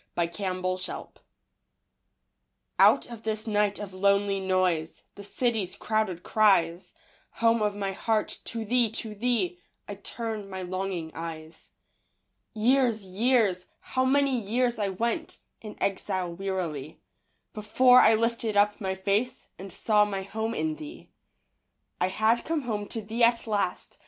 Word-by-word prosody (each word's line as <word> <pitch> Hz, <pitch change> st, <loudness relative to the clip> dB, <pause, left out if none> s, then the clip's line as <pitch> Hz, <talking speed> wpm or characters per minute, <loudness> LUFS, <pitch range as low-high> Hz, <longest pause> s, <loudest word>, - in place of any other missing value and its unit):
A 170 Hz, -, +3 dB
Nocturne 185 Hz, +1 st, -4 dB
of 185 Hz, 0 st, 0 dB
Exile 185 Hz, -, -6 dB, 1.7 s
Out -, -, +6 dB
of 230 Hz, -2 st, -8 dB
this 220 Hz, -1 st, -3 dB
night 210 Hz, -2 st, +1 dB
of 205 Hz, -2 st, -7 dB
lonely 200 Hz, +1 st, +2 dB
noise, 185 Hz, -4 st, 0 dB
The 200 Hz, -, -11 dB
city's 215 Hz, -3 st, -1 dB
crowded 215 Hz, -5 st, -1 dB
cries, 185 Hz, -5 st, +2 dB, 0.4 s
Home 230 Hz, 0 st, +2 dB
of 210 Hz, -1 st, 0 dB
my 200 Hz, -1 st, -2 dB
heart, 215 Hz, +2 st, -1 dB
to 230 Hz, -1 st, -4 dB
thee, 240 Hz, +1 st, +3 dB
to 220 Hz, -1 st, -5 dB
thee 210 Hz, -5 st, -1 dB, 0.3 s
I 205 Hz, -, -5 dB
turn 215 Hz, 0 st, -5 dB
my 190 Hz, -1 st, -5 dB
longing 185 Hz, -3 st, -3 dB
eyes. 160 Hz, -1 st, -8 dB, 0.9 s
Years, 235 Hz, -1 st, +2 dB
years, 200 Hz, -2 st, +1 dB
how 260 Hz, -, -1 dB
many 270 Hz, -1 st, +2 dB
years 235 Hz, +2 st, 0 dB
I 205 Hz, -2 st, 0 dB
went 230 Hz, +5 st, -2 dB, 0.2 s
In 215 Hz, -1 st, -9 dB
exile 190 Hz, -2 st, -1 dB
wearily, 170 Hz, -6 st, -4 dB, 0.5 s
Before 250 Hz, +4 st, +5 dB
I 220 Hz, +1 st, +6 dB
lifted 230 Hz, -1 st, -1 dB
up 205 Hz, +1 st, +3 dB
my 190 Hz, -1 st, -1 dB
face 205 Hz, +6 st, -1 dB
And 195 Hz, 0 st, -8 dB
saw 210 Hz, +3 st, +3 dB
my 195 Hz, -2 st, -3 dB
home 220 Hz, +3 st, -3 dB
in 315 Hz, -1 st, -1 dB
thee. 315 Hz, +2 st, -10 dB, 0.9 s
I -, -, +2 dB
had 220 Hz, +5 st, +2 dB
come 320 Hz, -2 st, -2 dB
home 210 Hz, -4 st, -3 dB
to 225 Hz, -, -5 dB
thee 225 Hz, +3 st, -1 dB
at 235 Hz, 0 st, +3 dB
last. 205 Hz, -5 st, -2 dB
210 Hz, 145 wpm, -27 LUFS, 190-230 Hz, 1.7 s, Out